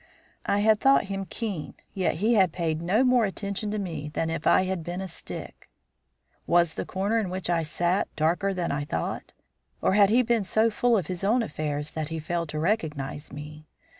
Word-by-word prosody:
I 205 - +2
had 215 0 +4
thought 270 +3 +5
him 195 -1 -4
keen, 200 -9 -4 0.2
yet 180 -6 0
he 215 +8 +2
had 190 -6 +4
paid 160 -2 -2
no 195 +9 +2
more 250 -2 +4
attention 200 +1 -3
to 215 - -2
me 160 -7 -4
than 160 +1 -2
if 165 -1 -2
I - - +5
had 185 -3 -2
been 175 +2 -4
a 190 - -4
stick. 165 - -8 0.8
Was 170 -1 +3
the - - -5
corner 200 +4 0
in 205 -4 -2
which 185 -1 -2
I 170 -1 +2
sat 175 +4 0
darker 175 +6 +1
than 180 -3 -2
I 145 +1 -1
thought, 85 - -4 0.5
or - - +2
had 200 -1 +6
he 245 +4 +4
been 235 -2 +1
so 220 +4 +2
full 235 +2 +3
of 185 - -1
his 180 +3 -5
own 230 +5 +3
affairs 150 -6 -3
that 155 -1 -3
he 160 +1 -4
failed 165 +1 -3
to 155 - -4
recognise 155 -6 -2
me? 150 +1 -9
180 Hz, 205 wpm, -26 LUFS, 160-210 Hz, 0.8 s, had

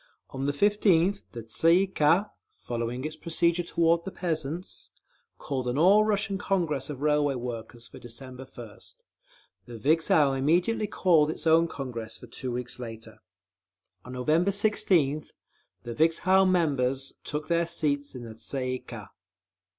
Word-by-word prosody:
On 135 +1 -3
the - - +2
15th, 200 +2 +2
the 115 -2 -7
Tsay 165 +9 +3
ee - - +1
kah, 185 +3 +2 0.2
following 120 +1 -5
its 155 +1 -4
procedure 170 +2 +1
toward 170 0 +1
the 195 - -5
peasants, 165 -1 -4 0.5
called 130 -3 -4
an 125 +2 -1
All 195 +7 +6
Russian 205 -2 0
Congress 165 -10 -1
of 140 -2 -6
Railway 150 -2 +2
Workers 120 -1 -6
for - - -13
December 125 +2 -8
1st; 135 - -11 0.7
the 120 -1 -8
Vikzhel 150 +1 +3
immediately 175 +11 +1
called 165 -6 +3
its 160 - -4
own 165 +1 +5
Congress 120 -7 -6
for - - -12
two 125 +2 -5
weeks 125 +1 -5
later. 115 -2 -8 0.8
On 125 - -9
November 155 +9 +1
16th, 185 -8 +1 0.5
the 120 -1 -5
Vikzhel 180 +6 +3
members 135 -7 0
took 150 +1 -4
their 170 0 +1
seats 145 -4 -1
in 125 - -7
the 115 - -8
_Tsay 130 +3 -4
ee 130 0 -2
kah. - - -10
150 Hz, 150 wpm, -27 LUFS, 125-170 Hz, 0.8 s, All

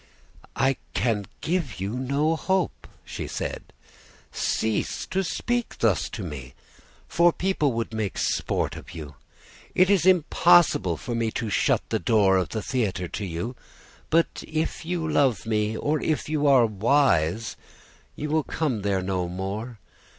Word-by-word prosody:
"'I 135 -1 +2 0.2
can 105 -2 0
give 160 - -2
you 95 +2 -2
no 140 +6 0
hope,' 190 +2 -1 0.2
she - - -5
said. - - -4 0.7
'Cease 110 -1 -1
to 190 +1 -1
speak 240 +7 -2
thus 110 -7 +1
to 105 - -6
me, 70 -7 -7 0.5
for 170 0 +4
people 175 -6 0
would 115 0 -3
make 110 -4 -2
sport - - 0
of 85 - -10
you. 75 -3 -7 0.6
It 185 +2 +5
is 185 -3 +3
impossible 175 - +4
for 120 - -5
me 115 -1 0
to 115 -3 -3
shut - - +2
the - - 0
door 100 -2 +4
of 90 -4 0
the 110 -2 -4
theatre 100 -9 -1
to 105 - -4
you; 90 +9 -4 0.5
but 165 +1 +1
if 160 +2 -2
you 170 -2 -1
love 135 - +2
me, 110 0 0
or 150 +1 0
if 155 - -1
you 150 -1 +1
are 130 -4 +6
wise, 110 - +2 0.6
you 150 0 -4
will 155 0 +2
come 140 -10 -2
there 95 -2 0
no 90 -2 -1
more. 100 +6 -5
115 Hz, 150 wpm, -25 LUFS, 100-155 Hz, 0.7 s, are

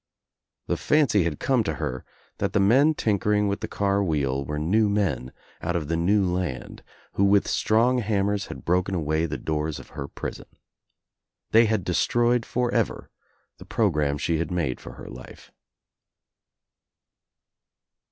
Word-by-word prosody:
The - - -1
fancy 135 - +3
had 80 -4 -2
come 130 -4 +2
to 80 -7 -2
her 65 -1 -4 0.4
that - - -1
the - - +3
men 135 +11 +4
tinkering 105 -2 +1
with 100 0 -1
the - - -4
car 100 0 0
wheel 70 -6 0
were 75 +2 -4
new 105 +8 +2
men 100 -11 -1 0.3
out 85 +1 -2
of 80 -3 -2
the 85 - +1
new 95 +4 +2
land 90 -7 -3 0.3
who 100 - +1
with 100 0 +4
strong 120 +4 +2
hammers 100 -2 0
had - - -9
broken 90 +2 +1
away 80 0 0
the 75 -2 -4
doors 75 +2 -2
of - - -12
her 70 - -6
prison. - - -7 1.0
They 115 +1 +6
had 110 -3 0
de 90 - -2
stroyed 120 +3 +2
forever 125 -1 -1 0.5
the - - -11
programme 75 -10 +1
sEe^had 80 +1 -1
made 80 -8 -2
for - - -9
her - - -11
life. 60 +1 -12
95 Hz, 150 wpm, -25 LUFS, 80-105 Hz, 1.0 s, They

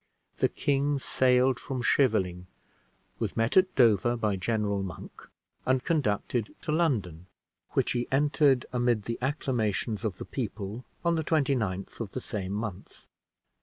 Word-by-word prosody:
The - - +2
king 140 0 +1
sailed 130 -1 +2
from 130 -3 -4
Scheveling, 95 -9 +2 0.7
was - - -3
met 115 +1 +1
at 185 0 +4
Dover 120 -1 +4
by 105 -3 0
General 100 0 -1
Monk, 95 -3 -8 0.3
and 130 0 +1
conducted 120 - 0
to - - -3
London, 105 - 0 0.5
which - - +1
he 120 0 -1
entered 140 -2 +3
amid 120 -3 +1
the 115 +2 -4
acclamations 120 - -1
of 105 -5 -1
the - - -7
people, 110 -1 -5 0.2
on 170 -1 +3
the 160 - 0
29th 130 - 0
of 110 -4 -5
the - - -2
same 100 -6 -4
month. 105 -3 -6
120 Hz, 140 wpm, -28 LUFS, 105-135 Hz, 0.7 s, at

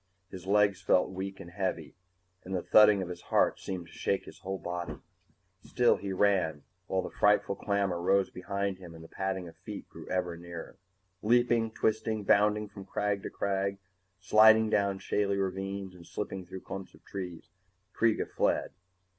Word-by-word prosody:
His 95 -1 -9
legs 100 -1 +3
felt 90 0 +3
weak 95 +1 -5
and 85 - -10
heavy, 90 -4 -3 0.5
and 95 +1 -4
the 90 - -1
thudding 105 -2 +6
of 90 - -7
his 90 - -7
heart - - +2
seemed 90 -3 -5
to - - -17
shake - - -1
his - - -12
whole 95 +1 -4
body. 85 -4 -4 0.7
Still 120 -1 +3
he 100 -1 -5
ran, 95 -6 +2 0.2
while 95 -1 0
the - - -6
frightful 105 -1 +3
clamor 100 -4 0
rose 95 +1 +2
behind 100 +1 -3
him 85 -3 -11
and 80 - -11
the - - -11
padding 95 -1 -3
of 80 - -12
feet 100 +3 -8
grew - - -11
ever 90 -2 -1
nearer. 85 +1 -9 0.4
Leaping, 120 0 +3
twisting, 110 0 0
bounding 105 +2 +3
from 100 -1 -10
crag 100 +1 -1
to - - -5
crag, 100 0 -1 0.4
sliding 110 +2 +6
down 100 -1 +2
shaly 100 0 0
ravines 95 0 -3
and 85 -2 -14
slipping 95 0 -5
through 95 +1 -8
clumps 95 -1 -8
of - - -23
trees, 90 -4 -7 0.4
Kreega 115 -1 +2
fled. - - 0
95 Hz, 170 wpm, -30 LUFS, 90-105 Hz, 0.7 s, thudding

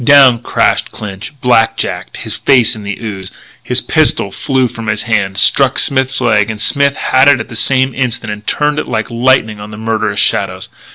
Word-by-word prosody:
Down 135 -3 +6
crashed - - 0
Clinch, 100 -1 -7
black 115 -2 +2
jacked, - - -4
his - - -5
face 125 -5 +3
in 110 - -9
the 100 -1 -5
ooze. 100 -5 -6 0.3
His - - 0
pistol - - +1
flew 130 -2 -1
from 115 -1 -9
his 105 -1 -2
hand, 100 -5 -1
struck 135 +5 +3
Smith's 130 -1 +1
leg; 110 -4 +1
and 110 -1 -5
Smith 140 +4 +1
had 130 +1 +2
it 140 -3 +5
at 110 - -7
the 115 - -9
same 130 +3 +1
instant 120 -4 -2
and 105 +1 -12
turned 150 0 0
it - - -5
like 110 -2 -3
lightning 115 -3 +1
on 105 +1 -9
the 105 - -10
murderous 110 -1 -2
shadows. - - -1
115 Hz, 195 wpm, -13 LUFS, 105-130 Hz, 0.3 s, Down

